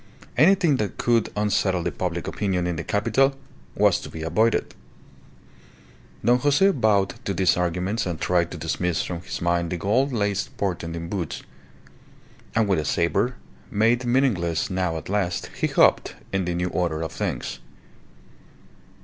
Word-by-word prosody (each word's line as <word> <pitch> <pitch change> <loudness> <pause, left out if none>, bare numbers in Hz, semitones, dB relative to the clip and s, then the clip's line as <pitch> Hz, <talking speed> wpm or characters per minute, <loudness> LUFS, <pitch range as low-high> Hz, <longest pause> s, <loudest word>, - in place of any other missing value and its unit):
Anything 165 +1 +4
that 105 -4 -3
could 115 -2 +2
unsettle 100 -3 +1
the - - -1
public 85 -2 -3
opinion 95 -4 -1
in 90 -1 -1
the 80 - -4
capital 115 - +2 0.4
was - - +3
to - - -8
be 80 - -7
avoided. 110 +8 +1 1.5
Don 120 +2 +4
Jose 145 +9 +4
bowed 105 - +1
to 100 - -2
these 90 -1 +3
arguments 90 +4 -1
and 85 -3 -3
tried 85 -2 +1
to - - -7
dismiss 80 +2 -1
from 85 -2 -5
his 85 - -6
mind 85 -1 +1
the 90 - -2
gold 115 +11 +1
laced 105 +3 -1
portent 85 -4 -2
in 85 0 -5
boots, 85 -4 -4 1.1
and 110 -2 +3
with 95 -4 +2
a - - -1
sabre, 100 - +1 0.3
made 115 +4 +2
meaningless 115 - +1
now 90 -3 -1
at 80 - -8
last, 95 -3 -1
he - - 0
hoped, - - +3 0.2
in 95 -1 0
the 90 0 -2
new 90 +1 -1
order 85 -3 -1
of 80 - -4
things. - - -4
95 Hz, 160 wpm, -24 LUFS, 85-115 Hz, 1.5 s, Anything